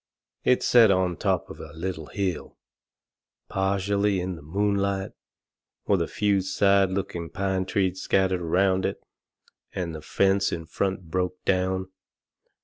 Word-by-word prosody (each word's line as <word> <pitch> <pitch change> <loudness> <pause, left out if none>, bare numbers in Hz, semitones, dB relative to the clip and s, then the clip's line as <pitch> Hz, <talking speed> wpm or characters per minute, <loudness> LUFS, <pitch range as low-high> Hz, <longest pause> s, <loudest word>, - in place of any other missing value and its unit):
It 125 - +3
set 115 -3 +6
on 95 -2 +2
top - - 0
of - - -10
a - - -9
little 80 -2 -5
hill, 95 -4 -3 0.9
partially 100 +1 +1
in 90 0 -3
the 80 - -11
moonlight, 100 +3 -1 0.7
with 100 -4 +2
a 85 - 0
few 100 -2 +1
sad 100 +1 +3
looking 90 -3 -3
pine 95 0 -1
trees 95 -2 0
scattered 95 -2 +1
around 95 +3 +2
it, - - -3 0.7
and 85 -3 -3
the 80 - -7
fence 95 +5 +2
in 80 -1 -4
front 95 0 -3
broke 90 0 -2
down. 95 0 0
95 Hz, 140 wpm, -26 LUFS, 90-100 Hz, 0.9 s, set